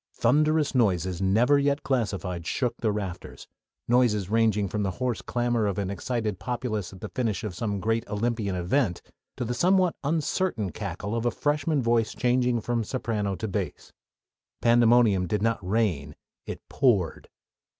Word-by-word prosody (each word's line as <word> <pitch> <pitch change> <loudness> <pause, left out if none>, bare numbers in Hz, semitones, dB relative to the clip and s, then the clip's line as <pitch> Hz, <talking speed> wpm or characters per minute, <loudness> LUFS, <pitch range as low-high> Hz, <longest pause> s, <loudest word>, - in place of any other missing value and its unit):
Thunderous 150 +1 +2
noises 95 - +1
never 115 +9 +4
yet 140 0 +1
classified 95 -9 -2
shook 125 -4 -1
the 110 - +2
rafters 95 -4 -6 0.4
noises 110 -6 +2
ranging 110 -3 +2
from 105 +3 -2
the 100 - 0
hoarse 125 -2 -1
clamor 120 -3 0
of 100 - -2
an 100 -1 -2
excited 110 -2 -2
populace 110 -1 -3
at 95 - -13
the - - -5
finish 115 -4 -2
of 105 -4 -4
some 100 +1 -2
great 115 +3 -1
Olympian 105 -2 -1
event, 90 +2 0 0.3
to 125 - -2
the 120 - -2
somewhat 180 +5 +3
uncertain 150 - 0
cackle 100 +2 -4
of 115 +1 0
a - - +4
freshman 145 +2 0
voice 115 -1 +1
changing 125 -2 +1
from 120 0 -1
soprano 105 -4 -2
to 110 - -4
bass. 100 - -4 0.7
Pandemonium 115 -5 +4
did 105 +4 -1
not 115 -1 +1
reign: 90 -8 -1 0.3
it - - -7
poured. 105 - +1
115 Hz, 155 wpm, -26 LUFS, 100-125 Hz, 0.7 s, never